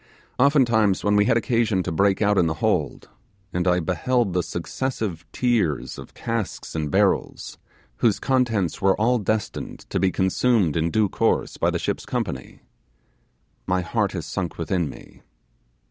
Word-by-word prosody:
Oftentimes, 120 -8 +3
when 105 0 +2
we 105 0 +4
had 115 0 +3
occasion 115 -5 +1
to 90 - -3
break 100 +5 +2
out 105 -1 +3
in 85 - +3
the 80 - -1
hold, - - -1 0.5
and 90 +1 0
I 90 0 +3
beheld 95 +6 0
the 90 - +2
successive 90 -2 -4
tiers 115 - 0
of - - -12
casks 115 -3 -4
and 75 -2 -2
barrels, - - 0 0.4
whose 110 -5 +2
contents 115 - 0
were 95 0 +3
all 120 +3 +3
destined 110 0 -3
to - - 0
be 95 - +3
consumed 95 -2 +2
in 80 0 +1
due 105 +4 +2
course - - 0
by - - +2
the - - -1
ship's - - -3
company, 65 - -4 1.0
my 90 0 +1
heart 100 +2 -1
has 85 -5 -4
sunk 85 +1 -4
within 85 -1 -1
me. - - -13
100 Hz, 160 wpm, -23 LUFS, 90-115 Hz, 1.0 s, we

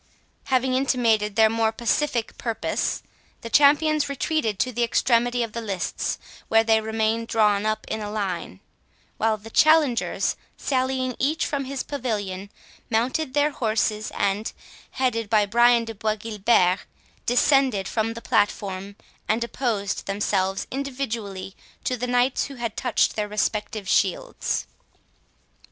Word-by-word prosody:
Having 260 -1 +1
intimated 230 -6 +2
their 220 0 +6
more 225 0 +1
pacific 235 +1 -1
purpose, 230 -2 -2 0.4
the 230 - -7
champions 295 +2 +4
retreated 280 - -1
to 255 - 0
the 240 0 -3
extremity 240 +1 +2
of 225 -2 -6
the 235 - -3
lists, 195 -5 -2 0.3
where 225 0 +4
they 220 -1 +3
remained 220 +1 -1
drawn 210 -2 +2
up 215 0 -1
in 220 - -3
a 210 - -4
line; 190 - -4 0.6
while 220 0 +1
the 220 +2 -12
challengers, 305 -6 +3 0.2
sallying 260 -1 -1
each 300 +4 +1
from 280 -3 -2
his 270 0 -4
pavilion, 205 -8 -3 0.4
mounted 255 +5 0
their 295 +1 +3
horses, 215 -3 -1
and, 200 +2 -1 0.4
headed 230 -5 -1
by 210 -1 +4
Brian 235 +2 +4
de 225 - -6
Bois 215 0 -1
Guilbert, 210 -4 +2 0.5
descended 250 -4 +3
from 225 0 -1
the 230 - -8
platform, 200 -1 0 0.3
and 225 +2 +1
opposed 230 -5 -2
themselves 195 -1 0
individually 235 -8 -4 0.3
to 255 - 0
the 250 +1 -3
knights 245 +1 +2
who 280 - -8
had 235 -3 -4
touched 250 -3 +1
their 210 -1 -1
respective 210 -1 -2
shields. - - 0
225 Hz, 135 wpm, -24 LUFS, 210-255 Hz, 0.6 s, their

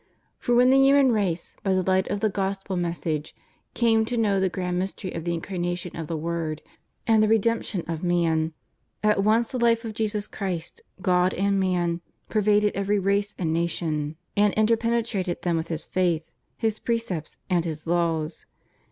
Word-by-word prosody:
For 240 - +1
when 250 +1 +6
the 270 - +6
human 275 -1 +5
race, 190 -6 -1
by 195 -3 +1
the 185 0 +2
light 190 +1 +2
of 200 - -2
the 215 - +3
Gospel 195 0 -2
message, 165 -3 -2 0.4
came 225 -2 +3
to 240 +2 -2
know 205 -4 +2
the 190 0 +2
grand 180 -1 -2
mystery 190 0 -4
of 165 0 -5
the 170 - 0
Incarnation 175 0 -3
of 165 -2 -5
the 165 - -2
Word 160 -1 -3 0.4
and 220 -2 +4
the 215 - +4
redemption 225 -4 +1
of 165 -1 -3
man, 165 -2 +1 0.5
at 210 -2 +3
once 225 +2 +3
the 255 - -3
life 230 0 +3
of 220 - -4
Jesus 210 -1 -1
Christ, 180 -6 -5 0.2
God 180 0 +3
and 200 +1 +1
Man, 175 -2 0 0.3
pervaded 210 -1 +3
every 200 +1 +1
race 200 +1 0
and 160 -3 -1
nation, 160 -3 -1 0.2
and 205 -1 +3
interpenetrated 225 -4 +1
them 175 -2 +1
with 160 0 -2
His 165 -1 -4
faith. 175 -3 0 0.3
His 220 -2 -1
precepts 230 -9 -3
and 175 -3 +2
His 155 -2 -5
laws. 165 -2 -1
190 Hz, 175 wpm, -25 LUFS, 170-215 Hz, 0.5 s, when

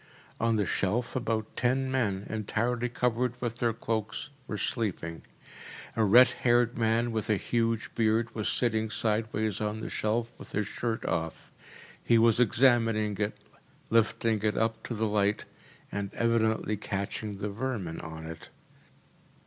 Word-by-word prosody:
On 115 0 +2
the 105 -2 +1
shelf 120 +8 -1
about 115 -3 -2
ten 130 +2 +1
men, 105 -7 0
entirely 115 +3 -1
covered 125 0 0
with 120 -1 -3
their 120 -1 +2
cloaks, 110 +5 -3 0.2
were 105 - -3
sleeping. 90 -9 -2 0.7
A 110 - +2
red 120 +5 +8
haired 120 0 +3
man 115 +1 +1
with 110 -2 -2
a 110 - +4
huge 115 +2 -1
beard 115 +1 +1
was 110 -2 -1
sitting 110 -3 +1
sideways 110 -1 0
on 105 +1 -2
the 110 - -5
shelf, 115 +2 0
with - - -11
his 105 0 0
shirt 115 +3 -3
off. 80 -1 -3 0.5
He 115 - +4
was 115 0 +5
examining 115 -3 +3
it, 105 0 -1 0.5
lifting 115 -1 +2
it 105 -1 0
up 115 0 0
to 120 - -3
the 110 +1 0
light, 105 -1 +1 0.5
and 100 -1 -3
evidently 110 -2 +1
catching 100 +1 -4
the 100 +1 -3
vermin 105 -7 -3
on 80 0 -8
it. 80 0 -9
110 Hz, 150 wpm, -29 LUFS, 105-120 Hz, 0.7 s, red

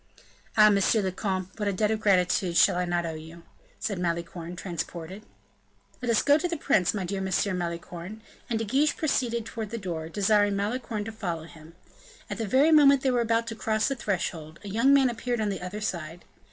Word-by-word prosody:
"Ah! 215 -1 +8
monsieur 200 +2 +3
le 190 - -1
comte, 185 -1 -3
what 210 -2 -2
a - - +2
debt 210 +3 +1
of 220 - 0
gratitude 185 -3 +2
shall 190 - +5
I 180 0 0
not 175 -1 -1
owe 165 - -3
you?" 160 +2 -10 0.4
said 200 -4 -3
Malicorne, 170 0 -3
transported. 175 +1 -6 0.8
"Let 245 - -3
us 230 - +3
go 290 +1 +5
to 355 - -1
the 340 -1 -3
prince, 215 -10 +2
my 195 -3 -2
dear 195 +2 -3
M. - - -2 0.3
Malicorne." 175 +4 -6 0.3
And 230 - 0
De 225 - -2
Guiche 280 +7 +1
proceeded 235 -7 0
toward 220 -3 -5
the 230 - -4
door, 170 -6 -5
desiring 205 +2 +2
Malicorne 215 +1 -2
to 225 - -5
follow 175 -7 -4
him. 160 0 -14 0.6
At 205 - -4
the 225 - -2
very 275 +9 +4
moment 280 -3 +6
they 265 - +3
were 245 -1 +2
about 230 0 +1
to 225 - -5
cross 220 -1 0
the 275 - -1
threshold, 170 -8 -3
a 205 - -7
young 230 +7 +3
man 275 -2 +6
appeared 240 0 -2
on 215 -1 0
the 195 - -4
other 185 +4 -6
side. 170 -4 -4
205 Hz, 210 wpm, -27 LUFS, 175-230 Hz, 0.8 s, Ah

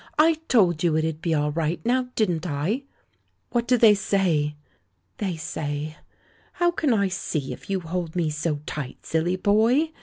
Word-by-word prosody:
I 315 +1 +4
told 180 -9 +3
you 165 -3 +3
it'd 160 0 -1
be 165 -2 +1
all 150 0 +1
right, 165 +2 -1
now 250 +1 +1
didn't 180 -6 0
I?" 175 - -1 0.7
"What 240 -1 0
do 250 - +4
they 225 -2 +7
say?" 175 -7 +1 0.6
"They 190 -5 -2
say 155 -1 -4 0.6
How 350 -1 +2
can 315 -5 0
I 200 -4 +3
see, 155 -6 -3
if - - -13
you 195 -1 0
hold 170 0 -4
me 165 -3 +1
so 150 -1 -2
tight, 140 -5 -6
silly 165 +3 0
boy? 225 - +3
175 Hz, 170 wpm, -25 LUFS, 155-220 Hz, 0.7 s, they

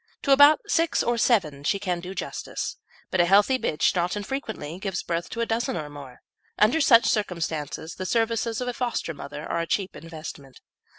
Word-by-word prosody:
To 280 - +1
about 285 +3 +7
six 330 -5 +1
or 240 - +1
seven 165 - +2
she 200 - +1
can 180 -3 -2
do 180 +2 -7
justice, - - -4 0.3
but 185 - +3
a - - +4
healthy 205 +8 +4
bitch 160 -1 +1
not 180 +1 0
infrequently 205 - -5
gives 195 -2 -3
birth 170 0 -3
to 230 - -4
a - - +1
dozen 225 -4 -1
or 150 -2 -5
more. 140 -4 -11 0.3
Under 230 +10 +4
such 235 -5 +6
circumstances 165 -6 -2
the 185 - -5
services 230 +1 0
of 250 - -3
a 245 - -1
foster 240 -9 -2
mother 145 +1 -8
are 170 - -2
a 165 - -2
cheap 195 +1 -1
investment. 155 -5 -9
190 Hz, 190 wpm, -25 LUFS, 165-235 Hz, 0.3 s, about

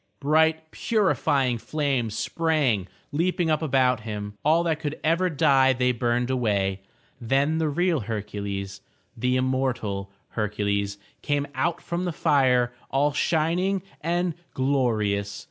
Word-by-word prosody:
Bright 160 +2 +2
purifying 140 - +1
flames 135 -6 -1
sprang 145 - +1 0.2
leaping 170 +2 +1
up 155 0 +1
about 130 -5 +2
him. 105 -2 -5
All 160 +3 +4
that 160 -2 0
could 150 -1 -4
ever 170 +4 +2
die 135 -3 +4
they 125 0 +2
burned 120 +1 0
away. 100 -6 0 0.4
Then 140 +7 +1
the 160 -1 +1
real 175 +1 +1
Hercules, 100 -3 -5 0.3
the 125 +2 0
immortal 130 -7 -1 0.2
Hercules 100 -2 -1 0.2
came 145 -1 0
out 170 +2 -1
from 175 +1 -3
the 175 - -1
fire 130 -6 +2 0.2
all 145 +2 +1
shining 175 +5 +1 0.2
and 175 +1 0 0.2
glorious. 110 -7 0
135 Hz, 125 wpm, -25 LUFS, 110-160 Hz, 0.4 s, All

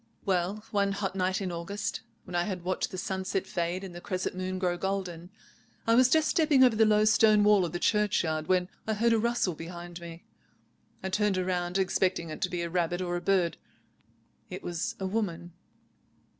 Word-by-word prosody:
"Well, 195 +2 0
one 200 -1 +1
hot 195 -1 -3
night 185 +1 0
in 185 -2 -2
August, 175 +5 -4 0.2
when - - -11
I 175 0 +1
had 185 -4 -4
watched 185 +1 -1
the 185 - -7
sunset 190 +1 -2
fade 175 +2 -2
and 190 -2 -7
the 175 - -8
crescent 185 -1 -3
moon 185 0 -3
grow 180 -1 0
golden, 180 -2 -3 0.6
I 230 - +3
was 250 +2 +6
just 315 +2 +3
stepping 305 -5 +4
over 245 -3 +5
the 220 0 +4
low 210 0 +4
stone 215 -1 +5
wall 205 -3 +5
of 165 - -4
the 175 - -2
churchyard 175 -6 +1
when 180 -1 +2 0.2
I 220 - 0
heard 230 +2 +3
a 225 - +3
rustle 235 -5 +1
behind 170 +2 -8
me. 170 0 -9 0.8
I 190 - -2
turned 205 0 +1
round, 180 0 -1
expecting 185 -3 0
it 155 - -7
to 185 - +1
be 175 -1 -2
a 170 - -3
rabbit 175 0 0
or 175 -1 -2
a 175 - -2
bird. 185 -3 +1 0.9
It - - -7
was 175 +7 -3
a 190 - -3
woman." 175 -4 -3
185 Hz, 200 wpm, -29 LUFS, 175-210 Hz, 0.9 s, was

